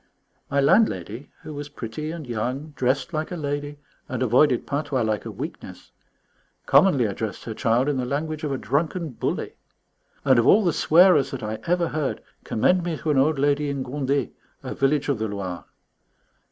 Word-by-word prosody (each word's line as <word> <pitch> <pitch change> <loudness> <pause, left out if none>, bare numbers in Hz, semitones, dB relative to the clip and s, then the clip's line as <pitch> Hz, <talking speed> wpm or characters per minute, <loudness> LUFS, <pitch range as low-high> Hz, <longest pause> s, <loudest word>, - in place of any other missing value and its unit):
My 140 - +1
landlady, 135 - +2
who 155 - -7
was 145 0 -6
pretty 145 +3 -6
and 165 -2 -6
young, 125 +6 -3
dressed 130 +1 0
like 155 0 -2
a - - -3
lady 145 -2 -4 0.3
and - - -2
avoided 125 +2 +3
patois 140 -3 -1
like 110 -1 -1
a - - -5
weakness, - - -8 0.7
commonly 145 -11 +5
addressed 105 +1 -4
her 115 - -5
child 115 +5 +1
in 145 -2 0
the 125 - -1
language 155 +4 -3
of 150 - -1
a 135 - -1
drunken 160 +5 -1
bully. 125 - -3 0.7
And 130 -3 +5
of 115 - +2
all 215 - +6
the 170 - +2
swearers 170 -3 +5
that 130 -4 -6
I 110 0 -4
ever 175 -1 +1
heard, 150 -3 -2 0.2
commend 180 +11 +2
me 170 -2 -2
to 155 - -1
an 140 - +3
old 150 +2 +3
lady 145 +1 +1
in 140 -2 -2
Gondet, 135 +1 -1 0.3
a - - -4
village 140 +1 +1
of 140 -6 0
the 110 - -1
Loire. 95 -4 -5
140 Hz, 180 wpm, -24 LUFS, 125-155 Hz, 0.7 s, all